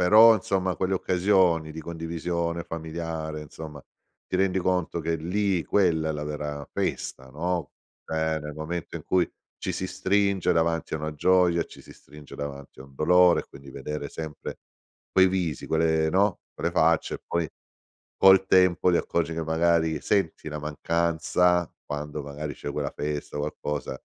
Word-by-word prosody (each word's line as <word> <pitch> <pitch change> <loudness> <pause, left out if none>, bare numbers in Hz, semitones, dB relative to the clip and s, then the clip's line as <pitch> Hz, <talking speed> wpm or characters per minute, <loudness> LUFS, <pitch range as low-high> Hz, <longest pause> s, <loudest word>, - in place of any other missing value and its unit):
Però, 110 +5 +8
insomma, 95 -3 -1
quelle 95 +1 0
occasioni 90 -4 +2
di 80 - -7
condivisione 85 0 -3
familiare 80 -1 -5
insomma, 75 -1 -9 0.4
ti - - -6
rendi 95 0 +2
conto 90 -2 0
che 80 +1 -1
lì, 90 +2 0
quella 85 -6 +2
è - - 0
la 75 0 -4
vera 75 -1 -4
festa, 65 0 -3
no? 85 +1 -2 0.3
Cioè 80 0 0
nel 75 0 -7
momento 80 +3 -5
in - - -9
cui 90 -2 +2 0.3
ci - - -3
si 95 - -3
stringe 100 0 +1
davanti 80 0 0
a - - -1
una 75 0 -3
gioia, 90 +1 +3
ci - - -14
si - - -13
stringe 75 -1 -14
davanti 70 -2 -7
a - - -9
un 70 0 -18
dolore, 90 +4 +5
quindi 70 0 -13
vedere 70 +2 -5
sempre 80 -1 -7 0.5
quei 95 0 +6
visi, 90 -6 -2
quelle 80 0 +2
no, 95 +2 +2
quelle 85 - -1
facce 80 -1 +2
e - - -24
poi 85 -1 0 0.7
col 95 0 +7
tempo 90 -1 +4
ti 85 - +4
accorgi 85 -1 -1
che 80 - -2
magari 80 -1 +2
senti 95 -6 0
la 75 - -4
mancanza, 85 +3 +1
quando 75 0 -5
magari 75 +1 -5
c'è - - -5
quella - - -2
festa, 75 0 -4
qualcosa, 75 0 -3
80 Hz, 160 wpm, -26 LUFS, 75-90 Hz, 0.7 s, Però